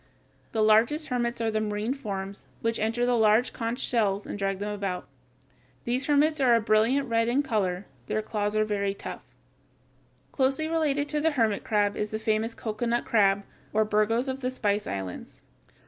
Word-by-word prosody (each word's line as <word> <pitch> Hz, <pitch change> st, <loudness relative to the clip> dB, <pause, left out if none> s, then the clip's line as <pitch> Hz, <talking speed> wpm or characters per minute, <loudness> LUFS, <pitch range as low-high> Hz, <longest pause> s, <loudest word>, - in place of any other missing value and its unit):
The 220 Hz, -1 st, +1 dB
largest 230 Hz, +9 st, +3 dB
hermits 240 Hz, -2 st, -1 dB
are 225 Hz, -1 st, +1 dB
the 215 Hz, 0 st, 0 dB
marine 210 Hz, +3 st, -1 dB
forms, 200 Hz, -7 st, -5 dB
which 230 Hz, 0 st, -1 dB
enter 230 Hz, +3 st, 0 dB
the 245 Hz, -, +2 dB
large 220 Hz, +2 st, +3 dB
conch 230 Hz, 0 st, -3 dB
shells 205 Hz, -4 st, +1 dB
and -, -, -6 dB
drag 195 Hz, -1 st, -1 dB
them 205 Hz, +2 st, -3 dB
about. 195 Hz, -3 st, -4 dB, 0.8 s
These 250 Hz, +3 st, -1 dB
hermits 300 Hz, +1 st, +3 dB
are 250 Hz, -3 st, +5 dB
a -, -, +4 dB
brilliant 225 Hz, +6 st, +2 dB
red 230 Hz, -1 st, +1 dB
in 260 Hz, +4 st, +2 dB
color. 200 Hz, -7 st, -1 dB, 0.2 s
Their 215 Hz, -, -1 dB
claws 210 Hz, -1 st, -2 dB
are 215 Hz, 0 st, +3 dB
very 200 Hz, -2 st, -1 dB
rough. -, -, -5 dB, 1.1 s
Closely 270 Hz, +3 st, +1 dB
related 300 Hz, -3 st, +1 dB
to 300 Hz, 0 st, 0 dB
the 320 Hz, 0 st, +2 dB
hermit 225 Hz, -6 st, +1 dB
crabs 205 Hz, -2 st, +1 dB
is 210 Hz, -, -2 dB
the 215 Hz, -, -3 dB
famous 220 Hz, +1 st, -1 dB
cocoanut 235 Hz, +2 st, -2 dB
crab 200 Hz, -2 st, +3 dB, 0.3 s
or 215 Hz, 0 st, +3 dB
Birgos 215 Hz, +4 st, +1 dB
of 265 Hz, 0 st, -3 dB
the 255 Hz, -1 st, -1 dB
Spice 210 Hz, -5 st, -1 dB
Islands. 95 Hz, -2 st, -6 dB
220 Hz, 180 wpm, -27 LUFS, 210-250 Hz, 1.1 s, are